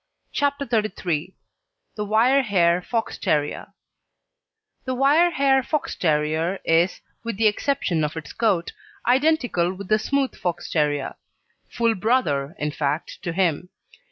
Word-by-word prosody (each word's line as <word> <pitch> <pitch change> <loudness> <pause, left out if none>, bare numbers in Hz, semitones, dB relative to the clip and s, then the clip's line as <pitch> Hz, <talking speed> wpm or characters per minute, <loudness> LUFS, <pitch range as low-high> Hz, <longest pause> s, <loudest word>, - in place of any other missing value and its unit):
CHAPTER 285 0 0
XXXIII 190 - -2 0.6
THE 210 - -3
WIRE 235 +6 +4
HAIR 180 -6 +2
FOX 225 +4 -3
TERRIER 150 -1 -1 1.2
The 260 -1 -2
wire 290 +7 +4
hair 270 -4 +3
Fox 300 +3 -2
terrier 160 +3 0
is, 170 +3 +2 0.2
with 230 -4 -4
the 225 - +1
exception 210 - +1
of 150 +2 -3
its 150 -4 -7
coat, 195 -7 0 0.3
identical 250 - +2
with 195 0 -9
the 215 0 +4
smooth 275 +4 0
Fox 175 -1 -4
terrier 145 -3 0 0.5
full 230 -1 +1
brother 180 - 0
in 150 0 -2
fact 145 +1 -3
to 175 - -3
him. 175 -1 0
195 Hz, 130 wpm, -23 LUFS, 165-255 Hz, 1.2 s, WIRE